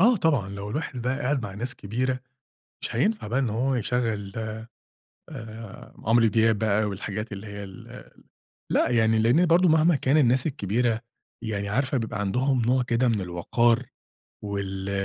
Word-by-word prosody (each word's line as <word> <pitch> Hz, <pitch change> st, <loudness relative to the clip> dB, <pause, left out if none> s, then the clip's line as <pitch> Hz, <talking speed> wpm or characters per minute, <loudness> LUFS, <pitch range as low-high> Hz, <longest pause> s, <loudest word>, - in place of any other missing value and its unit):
آه 235 Hz, +5 st, +6 dB
طبعًا، 145 Hz, -, +1 dB
لو 100 Hz, +1 st, -6 dB
الواحد 130 Hz, -1 st, -4 dB
بقى 130 Hz, +3 st, -1 dB
قاعد 135 Hz, 0 st, 0 dB
مع 100 Hz, -4 st, -6 dB
ناس 120 Hz, +4 st, -3 dB
كبيرة 125 Hz, +4 st, -2 dB, 0.6 s
مش -, -, -4 dB
هينفع 210 Hz, -, +1 dB
بقى 120 Hz, +5 st, 0 dB
إن 130 Hz, -4 st, +1 dB
هو 125 Hz, +5 st, 0 dB
يشغَّل 115 Hz, -4 st, -1 dB, 1.0 s
آآ، 110 Hz, -5 st, -9 dB
عمرو 115 Hz, +1 st, +4 dB
دياب 110 Hz, 0 st, +3 dB
بقى 110 Hz, 0 st, +2 dB
والحاجات 105 Hz, +2 st, -4 dB
اللي 100 Hz, +1 st, -7 dB
هي 100 Hz, 0 st, -7 dB
ال 95 Hz, -2 st, -12 dB, 0.6 s
لأ، -, -, +2 dB
يعني 110 Hz, -2 st, +3 dB
لأن 120 Hz, +11 st, +4 dB
برضو 175 Hz, +2 st, +5 dB
مهما 160 Hz, +1 st, +4 dB
كان 135 Hz, +1 st, +2 dB
الناس 130 Hz, -2 st, +3 dB
الكبيرة 115 Hz, -4 st, 0 dB, 0.4 s
يعني 105 Hz, -3 st, -3 dB
عارفة 130 Hz, +5 st, 0 dB
بيبقى 110 Hz, -2 st, -3 dB
عندهم 125 Hz, +6 st, +1 dB
نوع 125 Hz, +1 st, +3 dB
كده 125 Hz, +1 st, +1 dB
من 110 Hz, -3 st, +1 dB
الوقار، 115 Hz, +7 st, +1 dB, 0.6 s
وال 100 Hz, -1 st, -4 dB
115 Hz, 160 wpm, -26 LUFS, 105-130 Hz, 1.0 s, آه